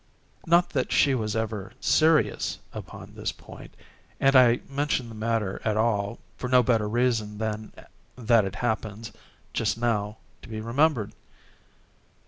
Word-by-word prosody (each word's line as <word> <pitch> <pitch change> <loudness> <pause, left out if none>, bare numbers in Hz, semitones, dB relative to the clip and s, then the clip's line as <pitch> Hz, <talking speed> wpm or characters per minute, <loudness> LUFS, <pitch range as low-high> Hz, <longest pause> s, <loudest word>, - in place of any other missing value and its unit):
Not 170 +2 +4
that 130 -3 -1
she 140 - +4
was 110 -4 -2
ever 110 -3 -3
serious 160 0 +2 0.2
upon - - -9
this - - -3
point—and 135 0 -4
I 125 -2 +6
mention 140 -3 -1
the - - -9
matter 110 -3 -2
at 110 -1 0
all 110 -1 0 0.2
for 125 - -4
no 125 -1 +5
better 110 -3 +1
reason 115 -3 0
than 110 0 -4 0.4
that 115 -3 +3
it 95 - -5
happens, 110 -2 -3 0.4
just - - 0
now, 110 -3 -1 0.2
to - - -13
be 110 -1 -5
remembered. 120 0 +1
115 Hz, 135 wpm, -26 LUFS, 110-125 Hz, 0.4 s, I